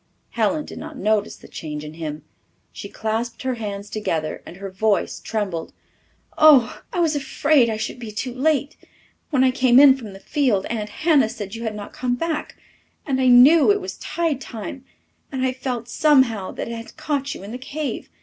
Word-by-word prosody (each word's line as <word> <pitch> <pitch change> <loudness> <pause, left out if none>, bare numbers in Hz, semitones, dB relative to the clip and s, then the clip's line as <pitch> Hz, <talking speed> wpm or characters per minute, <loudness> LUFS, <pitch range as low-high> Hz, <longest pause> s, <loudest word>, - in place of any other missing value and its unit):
Helen 235 +7 0
did - - -9
not - - -8
notice 210 0 0
the - - -15
change 150 -2 -6
in 150 0 -8
him. 155 -2 -6 0.5
She 200 - -8
clasped 225 +4 -3
her 260 -1 0
hands 205 -3 -5
together 160 -8 -3
and 175 - -10
her 195 0 -7
voice 205 +2 0
trembled. 195 -7 -3 0.7
"Oh, 290 -6 +6
I 370 - -2
was 325 -3 +2
afraid 285 -2 +2
I 220 - -2
should 220 +3 -4
be 230 -3 -7
too 240 +4 -4
late! 285 +2 0 0.5
When 265 -4 +3
I 260 - +4
came 255 -1 +5
in 275 -2 +8
from 225 -7 -9
the 195 - -11
field 245 -7 0
Aunt 215 -2 -3
Hannah 295 -7 +2
said 205 -3 -7
you 230 - -6
had 220 -1 -3
not 205 -1 -8
come 250 -1 -1
back 320 +3 -3 0.5
and 265 -3 0
I 260 - +3
knew 270 +7 +7
it 405 - +2
was 380 -1 -7
tide 325 -6 -2
time 245 +3 -7 0.5
and 260 -2 -1
I 255 - 0
felt 250 -2 -4
somehow 245 -8 +3
that - - -5
it 235 - -5
had 230 +5 -10
caught 285 -3 -2
you - - -10
in 200 - -8
the 250 - -6
cave. 285 +3 -5
245 Hz, 200 wpm, -22 LUFS, 210-280 Hz, 0.7 s, in